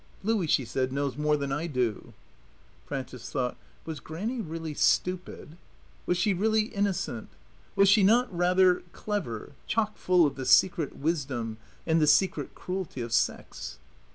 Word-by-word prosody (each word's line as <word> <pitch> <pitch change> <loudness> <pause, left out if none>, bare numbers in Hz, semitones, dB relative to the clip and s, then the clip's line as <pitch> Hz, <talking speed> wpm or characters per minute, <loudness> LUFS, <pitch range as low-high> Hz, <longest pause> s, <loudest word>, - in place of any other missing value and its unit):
"Louie," 210 -4 +1
she 135 -3 +2
said, 130 +3 -1
"knows 140 0 -1
more 150 +1 +1
than 140 -1 -3
I 150 +5 -1
do." 125 - -2 0.7
Frances 130 -2 -6
thought: 125 -3 -1 0.3
Was 160 -3 -5
Grannie 210 - -4
really 165 -3 -5
stupid? 180 -1 0 0.5
Was 180 - +2
she 200 +2 +2
really 215 +4 +2
innocent? 200 - -2 0.5
Was 195 0 +5
she 205 +2 +6
not, 225 +1 +3
rather, 180 +1 +4
clever, 175 - -4 0.2
chock 215 -1 0
full 180 -2 +4
of 140 -2 -2
the 130 - -4
secret 165 +2 +4
wisdom 135 -8 -2 0.3
and 160 0 +2
the 150 - +4
secret 170 +6 +2
cruelty 180 -8 -4
of 115 -1 -4
sex? 65 - -1
160 Hz, 150 wpm, -28 LUFS, 135-190 Hz, 0.7 s, she